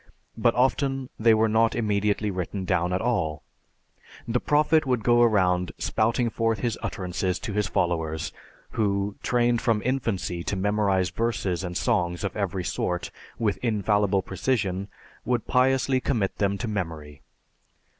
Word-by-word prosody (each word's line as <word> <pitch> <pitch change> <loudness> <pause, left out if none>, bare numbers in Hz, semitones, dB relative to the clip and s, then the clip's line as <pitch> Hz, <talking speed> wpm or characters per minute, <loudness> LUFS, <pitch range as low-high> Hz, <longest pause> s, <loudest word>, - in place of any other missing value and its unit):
But 115 +1 +2
often 135 +1 +1
they 115 0 +5
were 110 +1 +3
not 115 +1 +2
immediately 105 -2 0
written 95 +1 -4
down 90 -1 +1
at 90 - 0
all; 85 -11 -1 0.8
the 120 +1 +1
Prophet 150 +3 +3
would 125 -4 +1
go 120 +1 +4
around 90 -6 +2
spouting 115 +2 0
forth 115 -1 0
his 120 -3 0
utterances 90 0 -2
to 105 - -5
his 105 0 0
followers, 80 -5 -1 0.4
who, 100 -1 0
trained 120 -1 +2
from 115 -4 +1
infancy 110 -9 -1
to - - -1
memorize 95 -2 +1
verses 95 -3 -1
and 90 -1 -3
songs 90 -7 0
of 100 - -3
every 95 -3 -2
sort 90 0 -2 0.3
with 105 -4 0
infallible 105 -3 +1
precision, 100 -2 -1 0.4
would 120 -2 -1
piously 130 0 +2
commit 110 -7 -1
them 100 -1 +1
to 120 - -4
memory. 80 -8 -5
105 Hz, 145 wpm, -26 LUFS, 95-120 Hz, 0.8 s, they